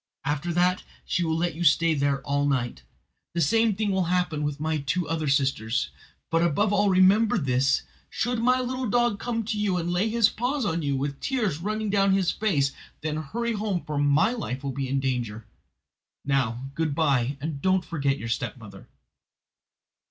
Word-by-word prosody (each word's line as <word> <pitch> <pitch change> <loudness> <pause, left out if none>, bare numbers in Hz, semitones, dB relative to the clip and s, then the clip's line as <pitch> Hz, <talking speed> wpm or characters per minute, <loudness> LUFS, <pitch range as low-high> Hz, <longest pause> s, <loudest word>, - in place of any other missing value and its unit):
After 150 +4 -1
that 180 +1 +2 0.2
she 175 - 0
will 160 -1 0
let 170 0 0
you 170 +3 -4
stay 165 +1 +4
there 140 -2 0
all 140 0 0
night. 120 - -1 0.5
The - - 0
same 225 +7 +3
thing 210 0 0
will 190 -2 +1
happen 180 -3 0
with 145 -1 -2
my 155 0 -1
two 150 +5 -1
other 160 -1 -2
sisters. 135 -4 0 0.4
But, 165 0 +3
above 195 +5 +2
all, 205 0 +3
remember 195 +4 +4
this: 135 -4 +1 0.3
should 245 0 -1
my 250 +2 +3
little 255 -1 -2
dog 240 -2 +2
come 230 -2 -2
to 215 -1 -2
you 200 -3 +1
and 175 0 -2
lay 190 +5 +1
his 230 -1 +4
paws 250 +3 -2
on 165 -2 0
you, 140 -2 0
with 140 +1 -3
tears 220 - -1
running 215 +3 -2
down 195 -1 +3
his 190 -2 +2
face, 150 -11 +1 0.3
then 155 0 -2
hurry 235 +10 -2
home, 205 -4 -2
for 150 -1 -2
my 145 +8 +3
life 140 - -4
will 140 - -2
be 135 0 -3
in 135 +1 +1
danger. 120 -5 -2 0.8
Now, 135 -2 -1
good 155 -1 -1
bye, 140 -4 +1
and 145 -1 -4
don't 185 0 +2
forget 140 -4 -1
your 115 - -6
stepmother." 110 -3 -5
165 Hz, 185 wpm, -26 LUFS, 140-205 Hz, 0.8 s, stay